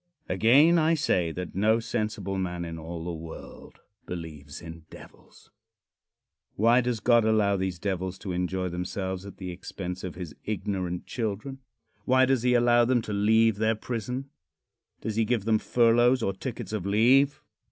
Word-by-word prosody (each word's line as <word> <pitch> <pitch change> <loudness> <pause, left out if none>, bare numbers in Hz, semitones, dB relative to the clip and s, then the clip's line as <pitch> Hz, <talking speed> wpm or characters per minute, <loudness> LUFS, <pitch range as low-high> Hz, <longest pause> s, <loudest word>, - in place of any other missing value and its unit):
Again, 135 - +5
I 160 +1 +3
say 90 - +1
that 90 +1 -6
no 110 +4 +3
sensible 110 -4 -3
man 90 -2 -3
in 80 -1 -6
all 80 +1 -6
the 85 0 -4
world 80 0 -10 0.3
believes 75 -5 -7
in 85 -1 -10
devils. - - -16 1.0
Why 115 +4 +4
does 120 -2 -1
God 120 +2 +4
allow 110 -2 +3
these 95 -2 -2
devils 95 0 -3
to 95 - -6
enjoy 90 +1 -2
themselves 95 +2 -4
at 100 - -11
the 90 -2 -6
expense 90 0 -7
of 90 - -5
his 85 -5 -7
ignorant 95 -4 -3
children? 115 +4 -4 0.5
Why 130 0 +4
does 130 -2 +1
he 125 0 +3
allow 120 0 +4
them 120 -1 +2
to 105 - -5
leave 110 +1 +3
their 110 +1 +1
prison? 125 +4 -5 0.7
Does 110 -1 -4
he 115 - +3
give 110 -2 0
them 110 -1 +3
furloughs 120 +2 +3
or 95 - 0
tickets 115 +1 -6
of 105 -4 -2
leave? 130 +7 +4
105 Hz, 165 wpm, -27 LUFS, 90-120 Hz, 1.0 s, Again